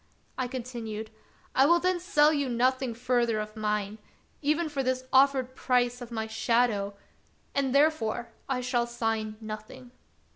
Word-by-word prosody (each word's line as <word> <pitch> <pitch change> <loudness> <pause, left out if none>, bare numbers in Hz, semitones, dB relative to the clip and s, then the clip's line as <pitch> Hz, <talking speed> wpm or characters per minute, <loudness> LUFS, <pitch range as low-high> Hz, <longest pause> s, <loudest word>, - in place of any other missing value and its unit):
I 255 -1 -1
continued: 230 -4 -6 0.2
" - - -32
I 270 +2 +6
will 340 +2 +5
then 365 +1 +1
sell 305 -3 +4
you 285 -3 0
nothing 255 0 +1
further 240 -2 +1
of 215 +1 -5
mine, 210 -1 -2 0.4
even 305 +3 +1
for 290 -3 -2
this 255 0 -1
offered 260 -1 +4
price 245 -1 +1
of 240 - -7
my 220 -2 -3
shadow; 220 -2 +1 0.6
and, 275 -1 +1
therefore, 280 -6 +2 0.2
I 255 -2 0
shall 245 -1 0
sign 225 -2 -2
nothing. 220 +3 -8
245 Hz, 150 wpm, -28 LUFS, 220-265 Hz, 0.6 s, I